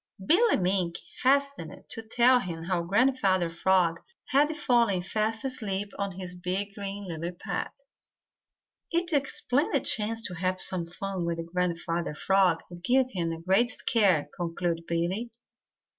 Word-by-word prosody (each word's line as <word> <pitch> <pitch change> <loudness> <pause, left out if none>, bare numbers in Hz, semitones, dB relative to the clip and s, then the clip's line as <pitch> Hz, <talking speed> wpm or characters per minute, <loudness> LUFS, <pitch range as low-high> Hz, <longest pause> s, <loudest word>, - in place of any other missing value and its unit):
Billy 425 - +4
Mink 180 -2 0 0.3
hastened 280 - +1
to 225 - -4
tell 240 +3 +4
him 170 -6 -5
how 175 0 0
Grandfather 195 -3 +2
Frog 170 -1 +2 0.3
had 285 +3 +4
fallen 235 -10 +2
fast 220 +4 -1
asleep 205 -6 -3
on 200 -1 -2
his 180 0 -6
big 185 +3 -3
green 200 0 -6
lily 170 0 -4
pad. 180 - -4 1.2
"It's 345 0 0
a 285 -2 +3
splendid 280 +2 0
chance 225 +1 +1
to 180 - -3
have 185 +1 -1
some 175 -3 -1
fun 190 +1 -4
with 170 0 -2
Grandfather 170 -2 -2
Frog 185 -1 +2
and 175 0 -10
give 255 +4 +3
him 170 -3 -2
a 165 - -5
great 195 +8 +3
scare," 200 - +2
concluded 170 -1 -2
Billy. 175 +8 -1
190 Hz, 145 wpm, -28 LUFS, 175-230 Hz, 1.2 s, Billy